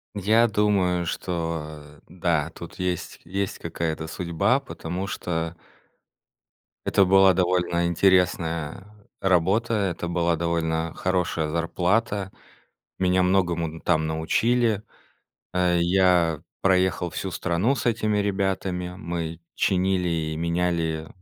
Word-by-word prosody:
Я 110 +4 +4
думаю, 95 -5 +1
что, 80 -3 -3 0.2
э, - - -21
да, 85 -3 -1
тут 85 - -10
есть 90 -2 -3
есть 95 +2 -3
какая-то 80 -1 -3
судьба, 90 +9 +1
потому 95 -8 -5
что 85 -4 -3 1.3
это 100 - +4
была 95 0 +6
довольно 90 -1 +1
интересная 85 -2 +1 0.4
работа, 95 +5 +2
это 95 -5 -1
была 85 -1 +1
довольно 80 0 -1
хорошая 90 -4 0
зарплата. 95 +5 0 0.7
Меня 90 0 +3
многому 90 -3 +2
н 80 +1 -9
там 80 0 +1
научили. 110 +8 +1 0.7
Э, 90 -1 +2
я 85 -3 +3 0.2
проехал 90 -2 +2
всю 95 +4 -4
страну 90 +9 0
с 120 - -4
этими 110 -2 +1
ребятами. 95 -3 -1
Мы 85 -1 -4
чинили 95 -1 +1
и 80 -2 -2
меняли, 85 -2 -1
90 Hz, 110 wpm, -25 LUFS, 85-95 Hz, 1.3 s, была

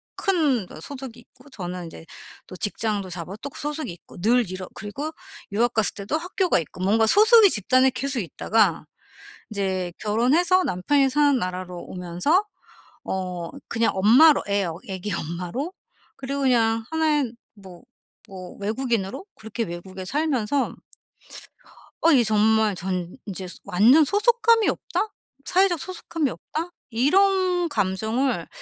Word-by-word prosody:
큰 300 - +1
저 - - -11
소속이 260 -4 -8
있고 255 +4 -20
저는 180 -2 -6
인제 165 0 -11 0.4
또 185 - -10
직장도 205 0 -2
잡아 175 +2 -6
또 285 - -5
그 - - -12
소속이 300 - -4
있고 170 - -16
늘 235 -1 +3
이렇 185 -1 -6
그리고 270 +10 -6 0.4
유학 235 +3 +1
갔을 220 -2 +1
때도 205 +10 -3
학교가 360 - 0
있고 170 +3 -8
뭔가 220 +4 +3
소속이 435 - +7
집단에 255 - +3
계속 270 0 -3
있다가 190 -2 +1 0.7
이제 190 -4 -2
결혼해서 290 - +2
남편이 270 - +2
사는 290 0 +3
나라로 180 0 -4
오면서 180 - 0 0.6
어 180 -3 -4 0.2
그냥 230 0 +1
엄마로 250 +11 +6
애 200 -1 +1 0.2
애기 190 +2 -4
엄마로 180 - -4 0.4
그리고 275 +1 -4
그냥 230 -3 +2
하나의 305 -6 +1 0.2
뭐 190 -4 -13 0.5
뭐 185 -2 -10
외국인으로 225 - -2
그렇게 220 +1 -5
외국에 185 +1 -8
살면서 280 0 -1 1.3
어 335 - +5
이 255 -6 +5
정말 215 -1 +3
전 180 -1 -4
인제 190 -2 -6 0.2
완전 220 - +5
'소속감이 455 - +3
없다?' 435 - -2 0.4
'사회적 370 -2 +2
소속감이 335 -4 -3
없다?' 330 +7 -5 0.2
이런 360 - +2
감정을 220 - -1
225 Hz, 285 characters per minute, -24 LUFS, 190-295 Hz, 1.3 s, 소속이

